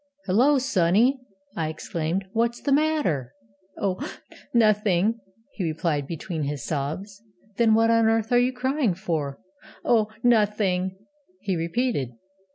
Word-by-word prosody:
'Hullo, 250 +10 +4
sonny,' 235 +2 +2 0.4
I 160 -5 -1
exclaimed,'what's 190 +9 -2
the 285 - -1
matter?' 275 - +1 0.4
'Oh, 190 -2 -1 0.5
nothing!' 215 -2 +3 0.3
he 195 - -4
replied, 155 -3 -1
between 165 +1 -4
his 145 0 -3
sobs. 165 +8 -4 0.4
'Then 225 -2 +4
what 225 +1 +4
on 230 -1 +4
earth 225 0 +1
are 245 - +5
you 250 +1 +2
crying 260 - 0
for?' 155 -6 -3 0.5
'Oh, 220 -3 +3 0.2
nothing!' 205 -5 +2 0.4
he 190 - -2
repeated. 170 - -1
205 Hz, 120 wpm, -25 LUFS, 165-235 Hz, 0.5 s, are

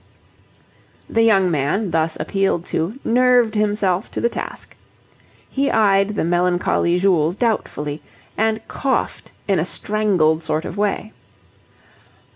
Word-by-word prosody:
The 225 - +1
young 195 -5 +4
man, 165 +7 -1
thus 160 0 0
appealed 195 -4 -1
to, 175 +10 -1
nerved 245 -1 +3
himself 210 -2 0
to - - -5
the 235 - +1
task. - - -7 0.7
He 275 +1 -1
eyed 200 -1 +2
the - - 0
melancholy 175 0 +1
Jules 180 -3 +2
doubtfully, 155 -10 -2 0.3
and 220 0 -1
coughed 270 -2 -2 0.2
in 195 -4 +2
a - - +1
strangled 180 -5 0
sort 155 0 -2
of - - -6
way. 210 +1 -2
195 Hz, 120 wpm, -20 LUFS, 170-220 Hz, 0.7 s, young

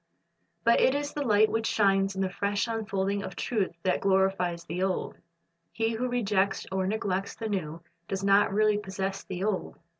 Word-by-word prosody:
'" - - -47
But 235 - +4
it 260 - +4
is 290 0 -2
the 295 - -3
light 215 -4 +4
which 225 0 0
shines 195 -1 +2
in 190 - -2
the 190 - 0
fresh 200 +3 -1
unfolding 200 -3 -1
of - - -7
truth 200 -7 -1
that 185 - +1
glorifies 190 -3 +1
the 170 +2 -4
old. 190 -1 -1 0.6
He 225 0 0
who 250 +3 -1
rejects 200 -5 0
or 190 0 0
neglects 195 -2 -2
the 225 - -4
new, 170 -5 -3 0.2
does 195 0 -3
not 200 +1 +4
really 210 +1 +3
possess 195 -1 -4
the 185 0 -5
old. 205 -2 -2
200 Hz, 185 wpm, -28 LUFS, 190-215 Hz, 0.6 s, But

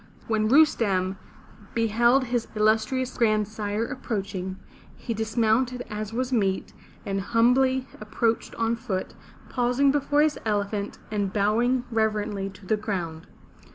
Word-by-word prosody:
When 220 -1 +1
Rustem 205 -10 +3 0.6
beheld 235 +3 +3
his 240 -2 -1
illustrious 220 +4 +1
grandsire 215 -1 0
approaching, 195 -7 -4 0.4
he 230 - -4
dismounted 225 +3 +1
as 210 0 -4
was 255 +2 -2
meet, 195 -5 0 0.3
and 195 -1 -1
humbly 255 +5 +3
approached 225 +2 -1
on 230 0 0
foot, 215 -6 -4 0.4
pausing 250 +3 +2
before 290 +1 +2
his 305 -1 +1
elephant, 205 -1 -2
and 205 -2 -1
bowing 230 +5 +2
reverently 210 -3 0
to 190 0 -15
the 215 +3 +1
ground. 175 -7 -4
220 Hz, 120 wpm, -26 LUFS, 205-245 Hz, 0.6 s, Rustem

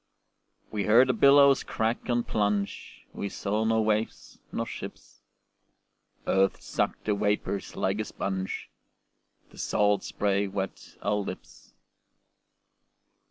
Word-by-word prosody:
We 105 -2 -1
heard 120 +5 +6
the - - +4
billows 140 +2 +6
crack 115 +3 -2
and 120 -1 +1
plunge, 105 -1 -2
We 100 - -4
saw 105 +3 -1
nor 110 -1 +2
waves 110 +1 -2
nor - - -2
ships. - - -9 1.0
Earth 95 0 +2
sucked - - -2
the 105 - +2
vapors 105 -1 -1
like 95 +2 0
a 110 - -1
sponge, 95 -2 -4 0.8
The - - -14
salt 105 -1 +2
spray 100 0 0
wet 95 0 -5
our 105 +1 +1
lips. 100 - -8
105 Hz, 115 wpm, -28 LUFS, 100-110 Hz, 1.0 s, heard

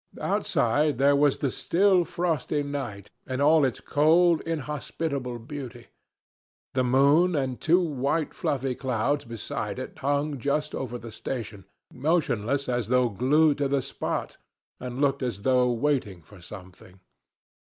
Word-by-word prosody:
Outside 145 +4 +1
there 140 +2 +4
was 145 -1 +3
the 140 -4 -1
still 185 +3 +2
frosty 160 -4 -1
night 135 -9 -6 0.2
in 130 0 -3
all 150 +2 +5
its 130 -4 0
cold, 165 +3 +3
inhospitable 150 -4 -3
beauty. 120 -1 -9 0.8
The 130 - +1
moon 140 +8 +4
and 130 -3 -2
two 170 +3 +4
white 150 -1 -1
fluffy 135 -2 -1
clouds 130 +3 -1
beside 115 -2 -5
it - - -7
hung 145 +1 -1
just 150 +4 -1
over 125 -2 -4
the 115 -1 -10
station, 110 -4 -6 0.3
motionless 140 -3 0
as 120 -4 -1
though 125 0 +3
glued 145 +8 +2
to 140 - +1
the 135 -1 0
spot, 135 - -4 0.4
and 125 0 -6
looked 140 -1 +1
as 120 -6 -3
though 125 -1 +3
waiting 120 - -1
for 95 +4 -16
something. 95 0 -12
135 Hz, 140 wpm, -26 LUFS, 120-150 Hz, 0.8 s, all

